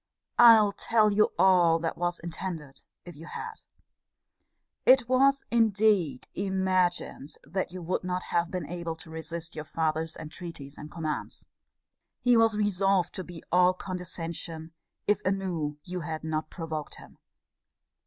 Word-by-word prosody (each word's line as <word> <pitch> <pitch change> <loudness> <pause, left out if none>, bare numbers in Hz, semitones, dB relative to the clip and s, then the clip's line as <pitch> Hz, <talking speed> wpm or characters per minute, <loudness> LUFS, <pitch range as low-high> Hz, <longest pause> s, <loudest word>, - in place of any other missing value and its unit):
I'll 225 -4 +8
tell 215 +1 +2
you 210 +1 +3
all 175 -3 +5
that 165 0 -3
was 175 0 -2
intended 165 -4 -6 0.2
if 175 -2 -10
you 160 +3 -11
had. 455 - -7 1.2
It 255 -2 +6
was, 275 +2 +4
indeed, 210 - +2
imagined 185 -6 -1
that 180 +5 -3
you 180 -1 -7
would 180 +3 -1
not 180 0 -2
have 170 -1 0
been 180 -3 -4
able 170 +1 -4
to 160 0 -12
resist 160 +1 -6
your 155 - -4
father's 160 +1 -2
entreaties 155 -3 -8
and 150 - -9
commands. 155 -2 -5 0.7
He 245 -1 +4
was 225 -2 +4
resolved 195 -3 +2
to 185 - -5
be 175 -2 -10
all 180 +1 +5
condescension, 170 -3 -6 0.4
if 210 - +2
anew 180 -6 -1
you 180 0 -5
had 160 -1 -5
not 155 0 -2
provoked 160 -3 -5
him. - - -15
175 Hz, 140 wpm, -28 LUFS, 160-195 Hz, 1.2 s, I'll